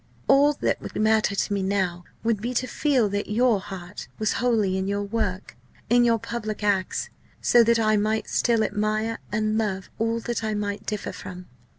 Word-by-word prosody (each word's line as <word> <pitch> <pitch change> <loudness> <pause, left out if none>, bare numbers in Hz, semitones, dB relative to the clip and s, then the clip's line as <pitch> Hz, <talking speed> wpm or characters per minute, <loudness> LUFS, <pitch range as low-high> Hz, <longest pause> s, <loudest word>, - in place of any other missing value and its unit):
All 285 +2 +5
that - - -1
would - - -8
matter 215 -1 +2
to 205 - 0
me 200 - 0
now 190 -3 -1 0.2
would 225 -3 0
be 245 +3 -3
to 255 - +1
feel 260 -4 +1
that 205 +1 -3
your 230 0 +3
heart 190 -1 -8
was 215 0 0
wholly 220 -6 +2
in 190 0 -1
your 200 0 -1
work, 200 -3 -3 0.4
in 240 0 +6
your 230 -1 +4
public 215 -2 -5
acts, 200 -2 0 0.3
so 240 -1 +5
that 235 0 +3
I 215 -1 +3
might 215 +1 0
still 230 -2 +2
admire 215 +2 -1
and 215 +1 0
love 195 -4 -2
all 230 +1 0
that 235 0 -3
I 215 -1 -1
might 205 0 -3
differ 210 -1 -3
from. 180 0 -9
215 Hz, 190 wpm, -25 LUFS, 200-230 Hz, 0.4 s, in